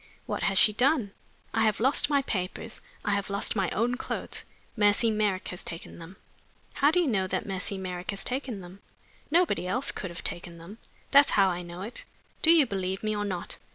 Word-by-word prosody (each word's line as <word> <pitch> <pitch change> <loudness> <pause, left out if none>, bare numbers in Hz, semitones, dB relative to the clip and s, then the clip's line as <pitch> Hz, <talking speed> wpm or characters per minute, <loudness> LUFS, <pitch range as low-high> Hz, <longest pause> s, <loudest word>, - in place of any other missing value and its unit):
"What - - -3
has 195 -1 +2
she 210 - +6
done?" 245 -3 +2 0.4
"I 225 - +2
have 215 -2 +2
lost 265 +5 +2
my 280 -2 +3
papers; 185 -7 -4 0.2
I 205 - +2
have 200 0 0
lost 200 +2 -2
my 195 -3 +1
own 240 +4 0
clothes; - - -4 0.3
Mercy 210 +1 +3
Merrick 210 -3 0
has 180 - -6
taken 165 0 -7
them." 170 +3 -10 0.6
"How 285 - +4
do 345 +4 +3
you 350 - +3
know 195 -9 +1
that 185 0 -2
Mercy 195 +1 -3
Merrick 180 -1 -5
has 200 -1 -1
taken 250 -5 -3
them?" 180 +2 -11 0.5
"Nobody 335 - +2
else 250 +9 +1
could 185 - -5
have 170 - -8
taken 175 -1 -3
them 180 +7 -11 0.3
that's 280 0 +7
how 195 -1 +6
I 175 -1 -2
know 175 +1 -7
it. 225 +4 -7 0.4
Do 320 - +4
you 330 -4 +7
believe 190 -3 -3
me 215 0 0
or 205 0 -1
not?" 185 -4 -4
200 Hz, 205 wpm, -28 LUFS, 185-245 Hz, 0.6 s, that's